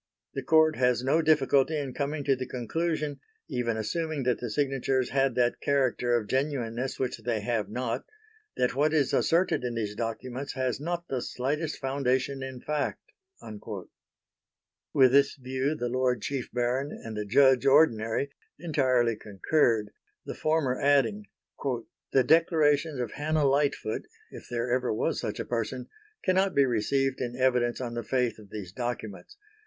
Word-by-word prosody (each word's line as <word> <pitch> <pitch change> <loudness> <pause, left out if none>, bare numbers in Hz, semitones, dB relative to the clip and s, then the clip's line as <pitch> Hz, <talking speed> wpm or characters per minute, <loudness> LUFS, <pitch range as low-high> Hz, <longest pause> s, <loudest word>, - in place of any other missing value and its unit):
The 135 - -3
Court 155 +3 +4
has 125 -1 +2
no 145 +5 +3
difficulty 155 -1 +3
in 140 -3 -3
coming 145 +2 -2
to 135 -1 +3
the 130 0 -5
conclusion, 150 +4 -2 0.3
even 120 -2 -1
assuming 155 +6 -2
that 125 -1 +1
the 120 - -4
signatures 135 0 0
had 135 -2 +2
that 120 -1 +1
character 130 -3 +1
of 115 - -3
genuineness 130 -2 -1
which 130 -3 -2
they 110 -1 -2
have 110 -1 -1
not, 120 +1 -3 0.5
that 125 - +1
what 150 +4 +2
is 145 -4 +2
asserted 170 -4 +2
in 120 -1 -2
these 105 -3 -2
documents 120 +4 -4
has 130 -2 -1
not 175 +3 -3
the 130 -2 -2
slightest 145 +7 -2
foundation 135 0 -1
in 130 -1 -6
fact." 150 -1 -3 1.8
With 130 -2 +5
this 140 +1 +4
view 130 +2 -2
the 120 -5 -2
Lord 125 0 0
Chief 135 -3 -3
Baron 125 +4 -1
and 115 -1 -8
the 105 - -2
Judge 130 +4 +4
Ordinary 135 -2 +3 0.3
entirely 130 -7 +1
concurred, 105 +1 +1 0.3
the - - -5
former 155 -5 0
adding: 145 +10 +2 0.2
"... - - -17 0.5
the 135 - +4
declarations 155 -2 +3
of 120 -3 -2
Hannah 150 0 0
Lightfoot, 140 -5 0 0.2
if - - -11
there 120 0 -2
ever 125 -1 +1
was 110 - -1
such - - -4
a - - -3
person, 120 +2 -3 0.3
cannot 190 0 +2
be 140 - +5
received 130 +3 0
in 120 -1 -3
evidence 125 -2 +1
on 120 -2 -4
the 120 - -2
faith 125 -1 -1
of 105 -2 -14
these 100 -4 -7
documents 120 - -5
130 Hz, 160 wpm, -28 LUFS, 120-145 Hz, 1.8 s, With